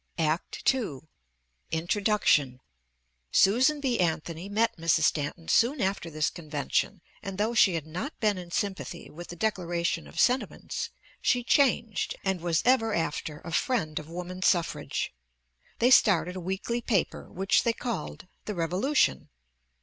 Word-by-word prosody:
ACT 160 Hz, -, +1 dB
II. 210 Hz, -, -4 dB, 0.7 s
INTRODUCTION: 165 Hz, -, +2 dB, 0.7 s
Susan 255 Hz, +10 st, +4 dB
B. 260 Hz, -4 st, 0 dB
Anthony 170 Hz, +1 st, -1 dB
met 220 Hz, +3 st, +1 dB
Mrs. 165 Hz, -1 st, +2 dB
Stanton 160 Hz, +1 st, 0 dB
soon 255 Hz, +5 st, +3 dB
after 195 Hz, -4 st, -1 dB
this 155 Hz, -1 st, 0 dB
convention 160 Hz, +4 st, -2 dB, 0.2 s
and 195 Hz, -1 st, -6 dB
though 215 Hz, +3 st, 0 dB
she 195 Hz, -6 st, +5 dB
had 160 Hz, -3 st, -3 dB
not 180 Hz, -, -6 dB
been 210 Hz, -3 st, +2 dB
in 175 Hz, -1 st, -9 dB
sympathy 190 Hz, -2 st, -4 dB
with 175 Hz, +3 st, -9 dB
the 175 Hz, -, -8 dB
"Declaration 175 Hz, -, -1 dB
of 70 Hz, -, -8 dB
Sentiments" 250 Hz, +2 st, 0 dB, 0.3 s
she 245 Hz, -1 st, +2 dB
changed 235 Hz, -5 st, +2 dB
and 190 Hz, -3 st, -1 dB
was 170 Hz, -1 st, +1 dB
ever 225 Hz, -4 st, +3 dB
after 155 Hz, -2 st, -3 dB
a 170 Hz, -, -8 dB
friend 160 Hz, -5 st, 0 dB
of 155 Hz, 0 st, -11 dB
women's 180 Hz, +2 st, -3 dB
suffrage. 170 Hz, -2 st, 0 dB, 0.6 s
They 245 Hz, +2 st, +3 dB
started 180 Hz, -7 st, +5 dB
a -, -, -4 dB
weekly 190 Hz, +7 st, -2 dB
paper 210 Hz, -6 st, -1 dB
which 190 Hz, +2 st, +2 dB
they 235 Hz, -, +2 dB
called 230 Hz, -5 st, -5 dB, 0.2 s
"The 210 Hz, -, -4 dB
Revolution." 180 Hz, -, +1 dB
185 Hz, 140 wpm, -28 LUFS, 165-225 Hz, 0.7 s, she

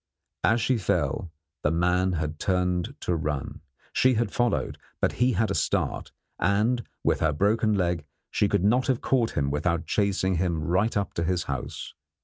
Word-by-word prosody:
As 115 Hz, +2 st, +3 dB
she 125 Hz, +1 st, +1 dB
fell, 90 Hz, -2 st, -1 dB, 0.3 s
the 75 Hz, -, +2 dB
man 90 Hz, +3 st, +2 dB
had 75 Hz, -2 st, -3 dB
turned 90 Hz, +5 st, 0 dB
to 90 Hz, -, 0 dB
run; 75 Hz, -3 st, -3 dB, 0.3 s
she 130 Hz, -1 st, +4 dB
had 110 Hz, -2 st, 0 dB
followed, 120 Hz, -1 st, 0 dB, 0.2 s
but -, -, +2 dB
he 125 Hz, +1 st, +2 dB
had 110 Hz, +1 st, +1 dB
a -, -, +1 dB
start, -, -, -1 dB, 0.3 s
and, 110 Hz, +5 st, +2 dB, 0.2 s
with -, -, +2 dB
her 80 Hz, -, +2 dB
broken 105 Hz, +6 st, +2 dB
leg, 85 Hz, -4 st, 0 dB, 0.3 s
she -, -, +2 dB
could -, -, +1 dB
not 120 Hz, +6 st, +3 dB
have 130 Hz, -3 st, +1 dB
caught 120 Hz, -4 st, +1 dB
him 70 Hz, -1 st, +1 dB
without 85 Hz, +3 st, 0 dB
chasing 95 Hz, -1 st, +1 dB
him 85 Hz, -2 st, 0 dB
right 95 Hz, +6 st, +1 dB
up 100 Hz, -2 st, -2 dB
to 85 Hz, -, -1 dB
his 90 Hz, 0 st, 0 dB
house. 65 Hz, -3 st, -5 dB
95 Hz, 175 wpm, -26 LUFS, 85-110 Hz, 0.3 s, she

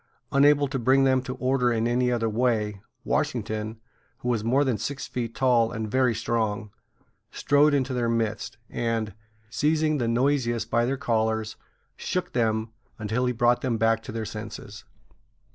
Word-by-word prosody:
Unable 145 Hz, +1 st, +5 dB
to 135 Hz, -1 st, -2 dB
bring 130 Hz, +3 st, +4 dB
them 130 Hz, -1 st, +3 dB
to 130 Hz, 0 st, -6 dB
order 130 Hz, -1 st, +1 dB
in 115 Hz, 0 st, +1 dB
any 125 Hz, +1 st, +1 dB
other 115 Hz, -2 st, 0 dB
way, 110 Hz, -3 st, 0 dB, 0.2 s
Washington, 110 Hz, +1 st, -2 dB, 0.4 s
who 125 Hz, -, -4 dB
was 115 Hz, -3 st, 0 dB
more 130 Hz, +5 st, +3 dB
than 125 Hz, -7 st, 0 dB
six 135 Hz, +5 st, -4 dB
feet 115 Hz, -2 st, -4 dB
tall 120 Hz, -4 st, +3 dB
and 110 Hz, -3 st, -4 dB
very 130 Hz, -2 st, +2 dB
strong, 110 Hz, -2 st, -1 dB, 0.6 s
strode 145 Hz, +1 st, +3 dB
into 130 Hz, -1 st, 0 dB
their 120 Hz, -2 st, 0 dB
midst, 110 Hz, -2 st, -2 dB
and, 115 Hz, -3 st, -2 dB, 0.4 s
seizing 155 Hz, +2 st, +1 dB
the 120 Hz, -, 0 dB
noisiest 120 Hz, -1 st, +1 dB
by 120 Hz, 0 st, +3 dB
their 135 Hz, +3 st, -1 dB
collars, 110 Hz, -3 st, 0 dB, 0.4 s
shook 180 Hz, -1 st, -3 dB
them 110 Hz, -2 st, 0 dB, 0.3 s
until 110 Hz, +4 st, -1 dB
he -, -, +2 dB
brought 120 Hz, 0 st, +2 dB
them 120 Hz, -4 st, 0 dB
back 115 Hz, 0 st, +2 dB
to 110 Hz, -, -8 dB
their 110 Hz, 0 st, -4 dB
senses. 105 Hz, -1 st, -8 dB
120 Hz, 160 wpm, -26 LUFS, 110-130 Hz, 0.6 s, Unable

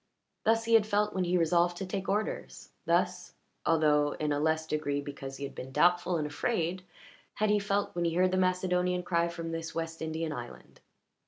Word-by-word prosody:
Thus 225 Hz, +1 st, +3 dB
had 225 Hz, -1 st, +5 dB
he 215 Hz, -, -12 dB
felt 210 Hz, 0 st, +1 dB
when 185 Hz, -1 st, 0 dB
he 180 Hz, +1 st, +2 dB
resolved 175 Hz, +1 st, +2 dB
to 195 Hz, -, -4 dB
take 195 Hz, +1 st, -4 dB
orders, 210 Hz, +2 st, -3 dB, 0.2 s
thus, -, -, 0 dB, 0.3 s
although 150 Hz, -2 st, +3 dB
in 150 Hz, -1 st, -2 dB
a 145 Hz, -, +1 dB
less 160 Hz, +1 st, +1 dB
degree, 150 Hz, -2 st, -1 dB
because 140 Hz, -1 st, -7 dB
he -, -, -7 dB
had 140 Hz, -, -5 dB
been 130 Hz, -, -8 dB
doubtful 175 Hz, +3 st, +3 dB
and 155 Hz, -, -1 dB
afraid, 170 Hz, +3 st, -1 dB, 0.5 s
had 215 Hz, 0 st, +1 dB
he 210 Hz, -, +4 dB
felt 200 Hz, 0 st, -1 dB
when 175 Hz, 0 st, -1 dB
he 165 Hz, -1 st, 0 dB
heard 185 Hz, +1 st, +3 dB
the 185 Hz, -, +1 dB
Macedonian 180 Hz, -1 st, +1 dB
cry 170 Hz, -1 st, +1 dB
from 170 Hz, -1 st, -5 dB
this 165 Hz, 0 st, -5 dB
West 165 Hz, 0 st, -4 dB
Indian 160 Hz, 0 st, -2 dB
island. 120 Hz, -3 st, -9 dB
170 Hz, 195 wpm, -30 LUFS, 155-185 Hz, 0.5 s, had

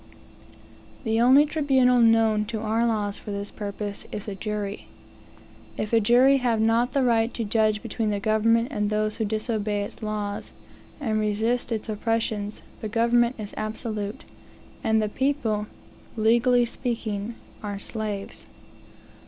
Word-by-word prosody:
The 225 Hz, -1 st, +1 dB
only 265 Hz, +5 st, +7 dB
tribunal 270 Hz, -5 st, +3 dB
known 225 Hz, -2 st, +4 dB
to 220 Hz, +1 st, -4 dB
our 225 Hz, +2 st, +1 dB
laws, 210 Hz, -2 st, -1 dB
for -, -, -10 dB
this 200 Hz, 0 st, -4 dB
purpose, 205 Hz, -1 st, -5 dB
is 210 Hz, 0 st, -6 dB
a 205 Hz, -, -3 dB
jury. 205 Hz, 0 st, -4 dB, 0.9 s
If 210 Hz, +2 st, -3 dB
a 230 Hz, -, +6 dB
jury 250 Hz, +5 st, +5 dB
have 240 Hz, -4 st, +1 dB
not 230 Hz, +3 st, +2 dB
the 275 Hz, -, +2 dB
right 230 Hz, -1 st, +2 dB
to 235 Hz, -, -2 dB
judge 215 Hz, 0 st, +1 dB
between 225 Hz, -1 st, -2 dB
the 205 Hz, -1 st, -1 dB
government 225 Hz, +3 st, +2 dB
and 210 Hz, -1 st, -1 dB
those 215 Hz, 0 st, 0 dB
who 220 Hz, -, 0 dB
disobey 215 Hz, -1 st, -1 dB
its 200 Hz, -, -9 dB
laws, 210 Hz, -1 st, -4 dB, 0.5 s
and 220 Hz, -7 st, 0 dB
resist 220 Hz, +4 st, 0 dB
its 220 Hz, -1 st, -2 dB
oppressions, 215 Hz, -1 st, -2 dB, 0.2 s
the 215 Hz, -, -4 dB
government 235 Hz, +2 st, +2 dB
is 210 Hz, -1 st, -6 dB
absolute, 215 Hz, -1 st, -4 dB, 0.6 s
and 220 Hz, -1 st, +3 dB
the -, -, 0 dB
people, 230 Hz, -4 st, -1 dB, 0.5 s
legally 240 Hz, +3 st, +4 dB
speaking 230 Hz, -3 st, -3 dB, 0.3 s
are 205 Hz, -1 st, -4 dB
slaves. 205 Hz, -1 st, -5 dB
220 Hz, 145 wpm, -25 LUFS, 210-235 Hz, 0.9 s, only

